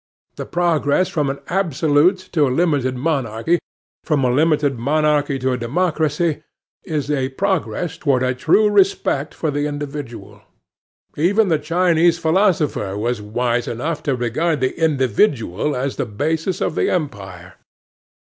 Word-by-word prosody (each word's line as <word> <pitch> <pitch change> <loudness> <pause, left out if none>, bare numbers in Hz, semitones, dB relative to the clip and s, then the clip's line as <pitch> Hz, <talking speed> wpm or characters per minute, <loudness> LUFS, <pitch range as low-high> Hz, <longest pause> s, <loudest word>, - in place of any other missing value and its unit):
The - - -6
progress 170 -1 +1
from 150 -3 -1
an 135 - -3
absolute 165 -1 +2
to 150 -5 +2
a - - 0
limited 135 -3 0
monarchy, 135 +1 0 0.4
from 150 -4 0
a 125 - +2
limited 145 -2 +1
monarchy 150 +1 +1
to 130 0 -1
a 125 - -2
democracy, 155 +3 0 0.4
is 150 -4 -3
a 135 -3 0
progress 165 - -2
toward 130 -4 +1
a 130 0 +1
true 210 +11 +3
respect 195 -8 +1
for 155 - -2
the 145 +1 -1
individual. 145 -4 -7 0.8
Even 195 +7 +2
the 160 -3 +2
Chinese 170 +1 +2
philosopher 160 - +1
was 115 +1 -2
wise 120 +3 -1
enough 145 +7 -3
to 140 -3 -1
regard 140 +7 -1
the 130 0 -1
individual 135 - +1
as 130 +2 -3
the - - -2
basis 160 - -2
of - - 0
the - - 0
empire. 95 - -5
145 Hz, 140 wpm, -20 LUFS, 130-165 Hz, 0.8 s, true